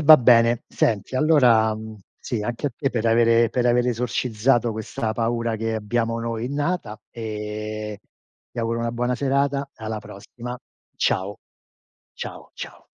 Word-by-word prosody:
E -, -, -2 dB
va 155 Hz, +1 st, +10 dB
bene. 115 Hz, -1 st, +5 dB
Senti 110 Hz, +2 st, 0 dB
allora 125 Hz, -7 st, +5 dB
mhmm, 110 Hz, 0 st, -8 dB, 0.2 s
sì 115 Hz, -4 st, -3 dB
anche 120 Hz, +6 st, -2 dB
a -, -, 0 dB
te 135 Hz, -3 st, 0 dB
per 115 Hz, -1 st, -1 dB
avere 115 Hz, 0 st, +4 dB
per 125 Hz, +1 st, 0 dB
aver 120 Hz, 0 st, +3 dB
esorcizzato 120 Hz, 0 st, +1 dB
questa 110 Hz, 0 st, -3 dB
paura 115 Hz, 0 st, -1 dB
che 115 Hz, 0 st, -2 dB
abbiamo 115 Hz, +2 st, -1 dB
noi 115 Hz, 0 st, -3 dB
innata 145 Hz, -, -2 dB
e 105 Hz, -1 st, -5 dB, 0.5 s
ti -, -, -9 dB
auguro 115 Hz, 0 st, 0 dB
una 115 Hz, 0 st, -1 dB
buona 125 Hz, +1 st, 0 dB
serata 140 Hz, +1 st, 0 dB
e 110 Hz, -, -11 dB
alla 110 Hz, 0 st, -3 dB
prossima. 115 Hz, +4 st, -8 dB, 0.4 s
Ciao. 95 Hz, +2 st, 0 dB, 0.8 s
Ciao, -, -, -8 dB
ciao. -, -, -9 dB
115 Hz, 155 wpm, -23 LUFS, 110-125 Hz, 0.8 s, va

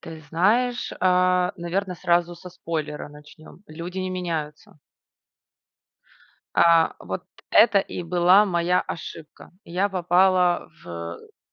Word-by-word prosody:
Ты 160 Hz, -1 st, -10 dB
знаешь, 235 Hz, +9 st, +1 dB
а, 180 Hz, 0 st, +2 dB
наверно, 180 Hz, +2 st, -3 dB
сразу 175 Hz, 0 st, +1 dB
со 180 Hz, +1 st, -12 dB
спойлера 155 Hz, -4 st, -5 dB
начнем: 150 Hz, +4 st, -16 dB
люди 170 Hz, +4 st, -7 dB
не 185 Hz, 0 st, -3 dB
меняются. 160 Hz, -5 st, -5 dB, 1.8 s
А, 165 Hz, -1 st, +4 dB
вот -, -, -6 dB, 0.3 s
это 205 Hz, -4 st, +6 dB
и 180 Hz, -2 st, -5 dB
была 180 Hz, +4 st, +4 dB
моя 180 Hz, -1 st, +1 dB
ошибка. 165 Hz, -2 st, -9 dB
Я 185 Hz, +3 st, -1 dB
попала 180 Hz, -1 st, +2 dB
в -, -, -15 dB
э 85 Hz, 0 st, -8 dB
175 Hz, 115 wpm, -24 LUFS, 165-185 Hz, 1.8 s, это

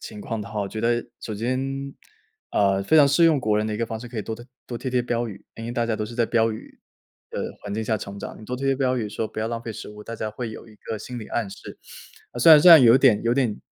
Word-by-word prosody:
情 105 Hz, -, -9 dB
况 115 Hz, +1 st, -4 dB
的 105 Hz, -, -7 dB
话， 105 Hz, -1 st, -3 dB
我 100 Hz, -, -2 dB
觉 110 Hz, -, -5 dB
得 120 Hz, +1 st, +1 dB, 0.2 s
首 110 Hz, -, -5 dB
先， 135 Hz, +5 st, -3 dB, 0.6 s
呃， 100 Hz, -1 st, +2 dB
非 130 Hz, +11 st, +3 dB
常 145 Hz, -2 st, +7 dB
适 145 Hz, +4 st, +4 dB
用 160 Hz, -3 st, +4 dB
国 105 Hz, -3 st, +1 dB
人 105 Hz, -, 0 dB
的 110 Hz, -, -2 dB
一 -, -, -3 dB
个 115 Hz, -, -1 dB
方 110 Hz, 0 st, -5 dB
式， 120 Hz, -, -8 dB
可 120 Hz, -, -10 dB
以 -, -, -2 dB
多 110 Hz, -, -5 dB
多 120 Hz, +2 st, -12 dB, 0.2 s
多 120 Hz, -, -5 dB
贴 130 Hz, -, -4 dB
贴 125 Hz, -1 st, +1 dB
标 120 Hz, -1 st, -2 dB
语， 100 Hz, -2 st, -11 dB
因 115 Hz, -, -7 dB
为 -, -, -4 dB
大 120 Hz, -1 st, 0 dB
家 115 Hz, -, 0 dB
都 110 Hz, -, -2 dB
是 115 Hz, -, -9 dB
在 115 Hz, -1 st, +2 dB
标 115 Hz, -1 st, +2 dB
语 110 Hz, -, -11 dB, 0.5 s
的 -, -, -5 dB, 0.2 s
环 105 Hz, -, -6 dB
境 110 Hz, -, -2 dB
下 110 Hz, 0 st, 0 dB
成 100 Hz, +1 st, -8 dB
长， -, -, -8 dB
你 -, -, -11 dB
多 125 Hz, +3 st, -4 dB
贴 135 Hz, -, -5 dB
贴 135 Hz, -, +3 dB
标 130 Hz, -1 st, +1 dB
语 110 Hz, -, -2 dB
说： 110 Hz, +1 st, -3 dB
“不 -, -, -9 dB
要 110 Hz, -, -1 dB
浪 115 Hz, 0 st, -4 dB
费 115 Hz, -, -6 dB
食 -, -, -8 dB
物。” 105 Hz, 0 st, -11 dB
大 115 Hz, -, -7 dB
家 110 Hz, -, -3 dB
会 115 Hz, +2 st, -5 dB
有 110 Hz, -, -10 dB
一 110 Hz, -, -16 dB
个 110 Hz, 0 st, -6 dB
心 125 Hz, +3 st, -7 dB
理 110 Hz, -, -8 dB
暗 115 Hz, -4 st, -2 dB
示， 100 Hz, -, -11 dB, 0.5 s
呃， 120 Hz, -, -6 dB
虽 165 Hz, -, +7 dB
然 150 Hz, -, +9 dB
虽 180 Hz, -, +8 dB
然 160 Hz, -5 st, +10 dB
有 120 Hz, 0 st, +7 dB
点 125 Hz, -6 st, +4 dB
有 115 Hz, +1 st, +1 dB
点 120 Hz, -6 st, 0 dB
115 Hz, 335 characters per minute, -24 LUFS, 110-125 Hz, 0.6 s, 然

